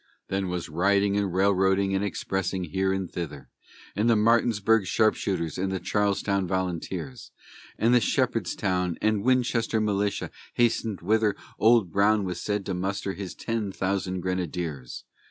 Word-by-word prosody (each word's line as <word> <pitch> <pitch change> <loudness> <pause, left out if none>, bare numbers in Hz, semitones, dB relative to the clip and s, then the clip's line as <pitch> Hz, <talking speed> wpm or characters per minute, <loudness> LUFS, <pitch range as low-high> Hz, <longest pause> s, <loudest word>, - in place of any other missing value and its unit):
Then 95 -1 -1
was 90 -1 -3
riding 100 +5 +2
and 100 -2 0
railroading 95 +1 +2
and 95 +1 0
expressing 95 -2 -2
here 95 +3 0
and 95 -1 -2
thither; 75 -5 -6 0.5
And 105 +3 +2
the 115 - +5
Martinsburg 110 -2 +3
Sharpshooters 95 -6 0
and 95 +1 -1
the 95 - -2
Charlestown 100 -2 0
Volunteers, 95 +5 -3 0.5
And 115 +2 +3
the 125 - +5
Shepherdstown 90 -3 0
and 110 -2 +1
Winchester 120 -3 +2
militia 105 -1 -1 0.2
hastened 115 -4 +1
whither 105 +2 +2 0.2
Old 110 -5 +4
Brown 100 +2 +3
was 90 -3 -4
said 105 -2 -2
to 95 - -2
muster 95 +2 -2
his 95 -2 -7
ten 115 -4 -3
thousand 95 -1 -2
grenadiers. 85 -7 -4
100 Hz, 140 wpm, -26 LUFS, 90-105 Hz, 0.5 s, the